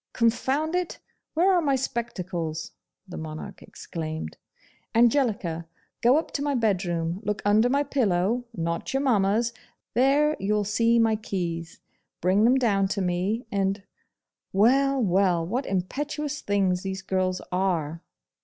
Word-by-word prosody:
'Confound 265 +7 +1
it! 360 -1 -1 0.4
where 370 +4 +4
are 355 - +3
my 280 -4 +2
spectacles?' 180 -11 -3 0.4
the 180 - -8
Monarch 155 -1 -7
exclaimed. 160 -1 -6 0.6
'Angelica! 220 - +2 0.3
go 245 +4 +5
up 320 - -1
into 280 - -3
my 285 -1 0
bedroom, 180 -6 0
look 210 0 -1
under 215 +4 +4
my 280 +2 +2
pillow, 230 -4 +1
not 170 +7 -3
your 270 - +2
mamma's; 225 -1 +2 0.4
there 285 +5 +3
you'll 210 +2 +1
see 230 +3 +2
my 225 -1 +4
keys. 170 -6 -4 0.4
Bring 190 +5 +3
them 250 +2 +5
down 205 -7 +2
to 200 - -2
me, 185 +6 -1
and 195 0 0 0.7
Well, 270 +7 +3
well! 185 -5 +2
what 245 +10 -2
impetuous 290 +10 -3
things 190 -3 +1
these 190 +1 -4
girls 185 -1 0
are! 170 -4 -1
205 Hz, 135 wpm, -26 LUFS, 180-250 Hz, 0.7 s, go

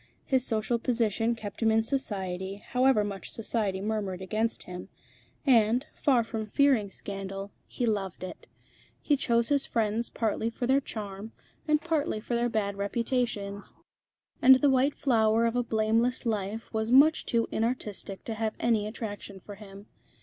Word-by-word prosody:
His 260 -2 +2
social 230 0 0
position 230 -1 0
kept 210 -2 -8
him 225 - +4
in 220 0 +3
Society, 195 -7 -2
however 250 -3 +3
much 200 -2 -5
Society 210 -4 -2
murmured 205 -3 -2
against 215 +4 -1
him; 180 0 -8 0.6
and, 240 -1 +4
far 255 -5 +2
from 225 -1 -5
fearing 255 -3 +3
scandal, 195 0 -6 0.2
he 245 - -2
loved 200 -5 -2
it. 185 - -8 0.5
He 295 - +2
chose 235 -4 +1
his 285 -1 +1
friends 225 +1 0
partly 225 0 -1
for 245 +2 -4
their 265 +3 +3
charm, 210 -2 -7 0.3
and 305 0 +3
partly 310 -8 -1
for 235 - -5
their 240 0 +1
bad 200 -3 -1
reputations; 205 -1 -2 0.7
and 260 +1 +9
the 275 +2 +3
white 265 +2 +2
flower 225 -3 +3
of 230 +1 0
a 245 - +2
blameless 230 +2 +1
life 215 0 -3
was 220 +1 -1
much 290 +5 +6
too 230 -1 0
inartistic 220 -4 -3
to 225 - -4
have 220 0 -2
any 220 -3 +1
attraction 205 -3 -6
for 205 - -10
him. 200 0 -12
225 Hz, 155 wpm, -28 LUFS, 205-245 Hz, 0.7 s, and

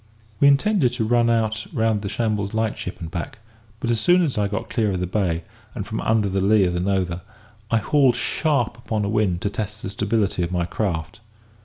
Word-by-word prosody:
We 140 - +6
intended 140 - +3
to 120 -3 -1
run 120 +1 +3
out 110 -1 0
round 110 -2 +1
the 100 - -4
Shambles 105 -2 -1
light 110 -1 0
ship 90 - -6
and 80 -1 -7
back; 85 +3 -5 0.4
but 120 - -1
as 115 - +1
soon 180 +7 +5
as 150 -6 -1
I 105 -1 +1
got 105 +3 -4
clear 110 -4 0
of 90 - -2
the 90 - -1
bay, 90 -3 -1 0.3
and - - -4
from - - -4
under 110 -2 +2
the 95 0 0
lee 100 +1 +4
of 90 - 0
the 90 - -1
Nothe, 90 -2 -1 0.5
I 115 - +3
hauled 130 +3 +3
sharp 140 -8 0
upon 110 -3 -2
a - - -1
wind 105 -5 +1
to 100 - -1
test 105 0 -5
the 95 - -4
stability 100 -2 0
of 85 0 -1
my 90 -1 0
craft. 85 -4 -3
105 Hz, 220 wpm, -23 LUFS, 95-115 Hz, 0.5 s, We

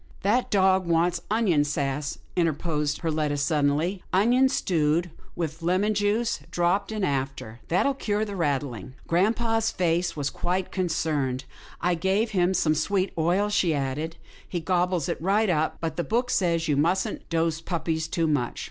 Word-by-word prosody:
" - - -25
That 225 +6 +2
dog 190 -2 +3
wants 170 +1 +2
onion 205 -9 +3
sass," 145 -1 -2 0.2
interposed 155 -3 0
Per 165 -2 0
letta, 150 -2 0
suddenly, 150 +5 +1
" - - -30
onions 245 +7 +4
stewed, 165 0 +1 0.2
with 165 -1 -4
lemon 185 +5 +1
juice 210 +3 0
dropped 180 +4 0
in 215 -2 -2
after. 135 -6 -2
That'll 185 +11 +2
cure 215 -5 -1
the 205 -1 -6
rattling." 135 - -2
Grampa's 225 +5 +1
face 175 -1 0
was 145 -2 -2
quite 180 +1 -2
concerned. 155 -7 -1 0.2
" - - -20
I 180 +1 +2
gave 190 +6 0
him 185 -1 +2
some 160 -3 +2
sweet 185 +5 0
oil," 175 +6 +1
he 180 -5 +2
said, 145 +3 -2 0.2
" - - -23
he 175 - -2
gobbles 180 -1 0
it - - -3
right 200 +3 +2
up, 160 -1 0
but 160 -1 -3
the 175 - 0
book 245 +5 0
says 170 -3 +1
you 150 - +2
mustn't 175 +6 0
dose 165 -1 0
puppies 165 -3 -2
too 165 0 0
much." 145 -6 0
170 Hz, 170 wpm, -26 LUFS, 155-195 Hz, 0.2 s, onions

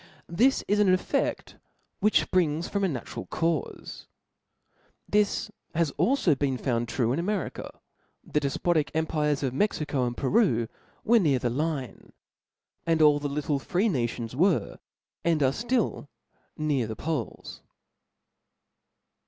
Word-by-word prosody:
This 255 +9 +3
is 205 +1 +2
an 210 - +4
effedk 185 0 0 0.4
^hkh 210 - +3
fprings 165 -2 +1
from 200 -1 -2
a - - +3
natural 125 - -5
caufe, 165 - -3 1.0
This 210 +1 +1 0.2
has 165 -3 +1
alio 260 - +3
been 135 -1 -1
found 120 -2 -1
true 120 -1 0
in 145 - -1
America; 190 -1 -3 0.4
the 150 - 0
defpotic 150 +1 0
empires 150 -2 0
of 130 -2 -1
Mexico 145 -6 0
and 120 - -5
Peru 135 - +2 0.4
were 235 +1 +5
near 150 -9 +3
the 120 -1 -1
Line, 140 -4 -3 0.7
and 165 -1 +2
almoft - - +5
all 145 -1 +5
the 145 0 -3
little 145 0 -1
free 185 +10 0
nauoiis 120 - -2
were^ 175 +6 +1 0.4
and 165 -3 +2
are 130 - +4
ftiil, 235 - -1 0.5
near 145 -6 0
the 110 - -5
Poles. 155 +6 -4
155 Hz, 135 wpm, -27 LUFS, 135-185 Hz, 1.0 s, were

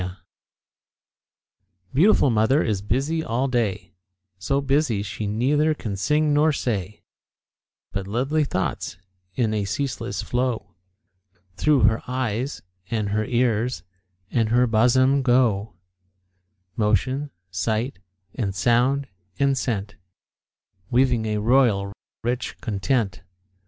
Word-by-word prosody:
_ 90 +1 -5 1.8
Beautiful 155 - +4
mother 115 +7 +3
is 105 -4 -1
busy 135 +10 -1
all 125 0 0
day, 115 -7 -1 0.5
So 135 +10 0
busy 135 -6 +1
she 105 +1 -4
neither 145 +9 +2
can 105 -8 -5
sing 150 +8 +1
nor 150 +2 +4
say; 105 -8 -3 0.9
But 100 -1 -4
lovely 135 +9 0
thoughts, 95 -7 -3 0.4
in 115 -4 +1
a 105 -1 0
ceaseless 105 -2 -3
flow, 120 -6 -2 0.8
Through 150 +2 +3
her 110 +1 +3
eyes, 125 +1 -2 0.3
and 110 -3 -1
her 110 +1 0
ears, 120 0 0 0.5
and 115 -3 +1
her 125 +2 +4
bosom 130 +4 +3
go 120 -6 +2 1.0
Motion, 130 +7 0 0.2
sight, 110 +6 -1 0.3
and 100 -6 -2
sound, 125 +7 +2 0.3
and 140 -1 +2
scent, 105 -5 -3 0.9
Weaving 120 -3 +2
a 105 0 0
royal, 105 -4 +2 0.3
rich 120 +2 -2
content. 105 -2 -1
120 Hz, 110 wpm, -23 LUFS, 105-135 Hz, 1.8 s, Beautiful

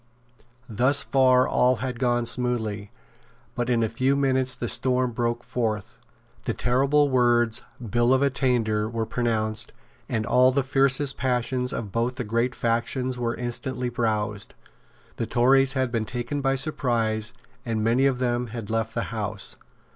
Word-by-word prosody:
Thus 130 +6 +2
far 130 -1 +4
all 125 +1 +3
had 125 +1 -4
gone 120 -2 +1
smoothly; 110 -4 -1 0.6
but 120 0 -2
in 120 -2 +2
a - - +2
few 130 +5 +1
minutes 130 -2 +1
the 120 - -4
storm 125 +1 +1
broke 120 0 -2
forth. 110 -4 -3 0.5
The - - -1
terrible 140 +4 +2
words, 120 -3 +2 0.3
Bill 120 +4 +2
of 130 +1 +4
Attainder, 120 -6 +1
were 115 -1 -2
pronounced; 110 -1 -1 0.4
and 110 -1 -1
all 125 +2 +4
the 135 +1 +1
fiercest 135 +1 +1
passions 125 0 0
of 105 -4 -4
both 120 +4 -1
the 130 - -3
great 115 +3 -1
factions 120 +2 -1
were 120 -1 -1
instantly 125 +1 -3
roused. 110 -3 -2 0.6
The - - -2
Tories 135 +2 +4
had 130 -2 0
been 115 -2 -1
taken 120 +5 -3
by 135 -1 +1
surprise, 115 -6 -1 0.3
and 110 -2 -2
many 120 +5 +3
of 135 -2 0
them 125 -1 -1
had 110 -2 -6
left 115 0 -1
the 115 - 0
house. 105 -2 -3
120 Hz, 155 wpm, -25 LUFS, 115-130 Hz, 0.6 s, far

